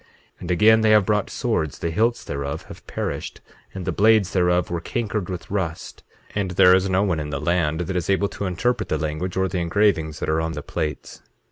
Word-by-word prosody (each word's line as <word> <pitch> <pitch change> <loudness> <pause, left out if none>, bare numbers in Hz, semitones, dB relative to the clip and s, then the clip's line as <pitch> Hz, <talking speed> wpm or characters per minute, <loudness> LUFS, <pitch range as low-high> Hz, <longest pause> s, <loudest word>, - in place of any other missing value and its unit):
8:11 - - -30 0.3
And 90 - -7
again, 110 +5 +5
they 110 - +3
have 105 -2 +5
brought 105 0 0
swords, 80 -2 -1
the 85 - -3
hilts 115 +7 +1
thereof 70 0 -4
have - - -13
perished, - - -4 0.3
and 95 -2 -7
the - - 0
blades 110 -2 +3
thereof 90 -1 +2
were 85 -1 -2
cankered 105 -1 -3
with 90 -1 -6
rust; 85 -5 -4 0.3
and 100 -2 -1
there 90 +1 +6
is 95 +1 +1
no 95 +1 +2
one 90 -6 0
in 75 -1 -4
the 70 -1 -3
land 80 0 0
that 95 +2 -3
is 90 -1 -2
able 100 +1 +2
to 100 - -4
interpret 110 +6 -1
the - - +1
language 80 +4 -3
or 95 0 +2
the 90 0 -2
engravings 85 -3 +1
that - - -3
are 80 +1 +1
on 80 0 -2
the 75 -1 -6
plates. 75 -1 -5
90 Hz, 225 wpm, -23 LUFS, 80-100 Hz, 0.3 s, there